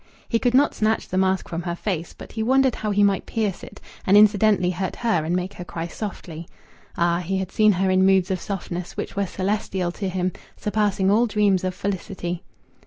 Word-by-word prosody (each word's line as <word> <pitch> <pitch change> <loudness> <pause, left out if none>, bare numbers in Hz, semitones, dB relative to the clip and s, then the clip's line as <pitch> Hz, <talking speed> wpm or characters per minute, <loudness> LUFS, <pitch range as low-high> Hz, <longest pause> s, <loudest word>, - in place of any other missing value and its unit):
He 230 - +1
could 245 +1 +1
not 285 +2 +4
snatch 220 +1 0
the 185 - -2
mask 190 -1 +1
from 165 0 -4
her 170 -1 -3
face, 175 -3 -3
but - - -10
he 220 - -4
wondered 260 +2 +3
how 215 - -3
he 205 0 +3
might 200 -2 +2
pierce 215 -5 -2
it, - - -11 0.2
and 195 +2 +5
incidentally 205 -3 +4
hurt 185 +1 -3
her 225 -9 0
and 165 +3 -1
make 180 +1 -2
her 180 - -8
cry 165 -1 -5
softly. 170 -3 -7 0.5
Ah! 170 0 +2
He 185 +2 -2
had 190 -1 -3
seen 215 -1 +4
her 190 +1 +1
in 185 0 +4
moods 190 0 +3
of 185 - -1
softness 180 -3 -5
which - - -4
were 200 -1 0
celestial 190 -2 -2
to 195 +2 -4
him 185 0 -1 0.3
surpassing 205 -2 +1
all 230 +4 +4
dreams 205 -4 +2
of 185 -1 -2
felicity! 185 -3 -4
190 Hz, 210 wpm, -23 LUFS, 180-210 Hz, 0.5 s, and